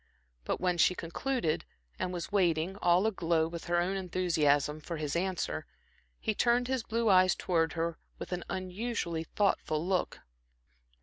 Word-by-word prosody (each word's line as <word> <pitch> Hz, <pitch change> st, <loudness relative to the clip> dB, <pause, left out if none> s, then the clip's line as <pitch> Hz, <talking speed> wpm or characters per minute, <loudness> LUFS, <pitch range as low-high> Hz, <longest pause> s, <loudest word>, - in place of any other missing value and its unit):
But -, -, -1 dB
when 180 Hz, -1 st, 0 dB
she 180 Hz, -, +5 dB
concluded, 170 Hz, +1 st, -1 dB, 0.4 s
and 180 Hz, -, -1 dB
was 175 Hz, +1 st, -5 dB
waiting, 175 Hz, -2 st, +2 dB
all 180 Hz, +1 st, +3 dB
aglow 170 Hz, -6 st, +1 dB
with 170 Hz, 0 st, -7 dB
her 175 Hz, 0 st, +2 dB
own 180 Hz, +3 st, 0 dB
enthusiasm, 155 Hz, -5 st, +1 dB
for 170 Hz, +1 st, -5 dB
his 150 Hz, -1 st, -3 dB
answer, 185 Hz, +1 st, -2 dB, 0.5 s
he 220 Hz, -, 0 dB
turned 240 Hz, +3 st, +2 dB
his 260 Hz, -1 st, 0 dB
blue 230 Hz, +1 st, -1 dB
eyes 185 Hz, -2 st, +5 dB
towards 165 Hz, -2 st, 0 dB
her 165 Hz, 0 st, -2 dB, 0.2 s
with -, -, -7 dB
an 180 Hz, -1 st, -2 dB
unusually 185 Hz, -2 st, -3 dB
thoughtful 165 Hz, -5 st, 0 dB
look. 185 Hz, -1 st, -1 dB
180 Hz, 150 wpm, -31 LUFS, 165-195 Hz, 0.5 s, she